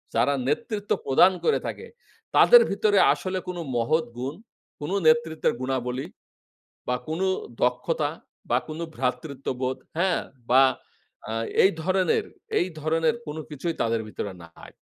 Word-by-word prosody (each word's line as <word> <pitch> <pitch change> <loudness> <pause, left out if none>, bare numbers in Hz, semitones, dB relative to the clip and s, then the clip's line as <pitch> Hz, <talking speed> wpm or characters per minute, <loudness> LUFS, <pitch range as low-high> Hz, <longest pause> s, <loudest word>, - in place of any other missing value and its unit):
যারা 120 +5 +3
নেতৃত্ব 205 - -2
প্রদান 175 +8 +6
করে 460 - +3
থাকে, - - -6 0.5
তাদের 485 -1 +8
ভিতরে 205 0 +2 0.2
আসলে 185 0 -3
কোনো 180 -1 -4 0.2
মহৎ 155 +8 +1
গুণ, 130 +3 -3 0.5
কোনো 160 +7 -2
নেতৃত্বের 160 0 +3
গুণাবলী, 130 0 -2 0.8
বা 125 - +2
কোনো 165 +5 -1 0.4
দক্ষতা 135 +5 +1 0.4
বা 120 - +4
কোনো 155 +2 -4
ভ্রাতৃত্ববোধ, 130 0 -2 0.2
হ্যাঁ? 180 0 +2 0.3
বা 130 +2 +7 0.7
আ - - -2 0.3
এই 190 - +6
ধরনের, 185 0 +2 0.3
এই 180 - +1
ধরনের 160 +7 +1
কোনো 150 +1 -5
কিছুই 160 +3 -3
তাদের 115 0 0
ভিতরে 100 -2 -5
নাই। 85 0 -14
155 Hz, 130 wpm, -25 LUFS, 130-180 Hz, 0.8 s, তাদের